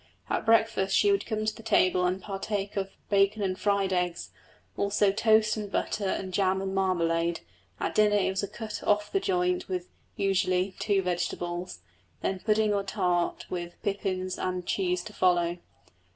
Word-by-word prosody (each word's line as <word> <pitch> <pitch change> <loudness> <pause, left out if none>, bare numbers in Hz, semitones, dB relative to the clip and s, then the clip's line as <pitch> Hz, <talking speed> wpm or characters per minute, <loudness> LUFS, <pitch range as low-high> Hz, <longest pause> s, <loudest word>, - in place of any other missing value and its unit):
At - - -1
breakfast 225 -4 +3
she 405 - +4
would 395 - 0
come 215 -1 -2
to 215 - -1
the - - -11
table 185 -5 +3
and 185 +1 -1
partake 200 +1 -4
of 195 -1 -1 0.2
bacon 200 +1 +3
and 185 -1 0
fried 200 -1 +1
eggs, 180 -1 -1 0.4
also 200 0 +2
toast 215 0 +3
and 205 -2 -5
butter 200 0 -1
and 190 0 -3
jam 190 0 +2
and 190 0 -3
marmalade, 170 -3 +1 0.4
at - - -2
dinner 210 -1 +4
it 200 -2 +2
was 190 - -1
a 200 - -2
cut 220 -1 -6
off 210 0 +1
the 390 - +2
joint 180 - 0
with 180 -1 -3 0.3
(usually) 190 -1 +1
two 200 -2 +1
vegetables, 175 - -3 0.4
then 190 -1 -1
pudding 215 +1 +2
or 200 - +1
tart 180 -3 -1
with 175 -1 -5
pippins 190 -3 -2
and 180 -1 -2
cheese 180 -2 0
to 215 - -9
follow. 175 -2 +2
195 Hz, 170 wpm, -28 LUFS, 180-205 Hz, 0.4 s, she